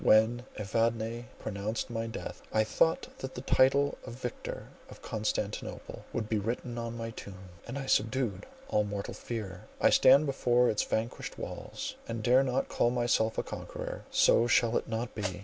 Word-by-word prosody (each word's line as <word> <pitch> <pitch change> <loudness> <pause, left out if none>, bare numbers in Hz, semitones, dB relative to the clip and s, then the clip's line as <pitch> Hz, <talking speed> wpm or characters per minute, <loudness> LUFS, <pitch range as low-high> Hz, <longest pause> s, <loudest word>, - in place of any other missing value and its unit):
When 115 +3 +5
Evadne 115 +2 0
pronounced 110 +3 -3
my 115 0 -2
death, 115 - -6
I 110 - +3
thought 165 +9 +2
that 130 0 -6
the 125 - -4
title 135 +2 +3
of - - -7
Victor 125 -1 -5 0.2
of - - -13
Constantinople 105 -1 -3
would 110 -2 -2
be 110 -1 +1
written 120 +3 -3
on 115 0 -4
my 115 0 -4
tomb, 95 -4 -10 0.2
and 120 +4 -4
I 135 - -4
subdued 110 -5 +1 0.2
all 105 - +2
mortal 100 -1 -4
fear. 100 -6 -6
I - - +5
stand 140 +4 +7
before 125 -3 +3
its 105 - +1
vanquished 115 +2 -2
walls, - - -6
and 115 -1 -4
dare 125 +3 +6
not 130 0 0
call 120 - +2
myself 120 -2 +1
a - - +1
conqueror. - - -6
So 115 - +5
shall 120 -1 +3
it - - 0
not 115 +1 -3
be! 95 -4 -3
115 Hz, 170 wpm, -31 LUFS, 110-125 Hz, 0.2 s, stand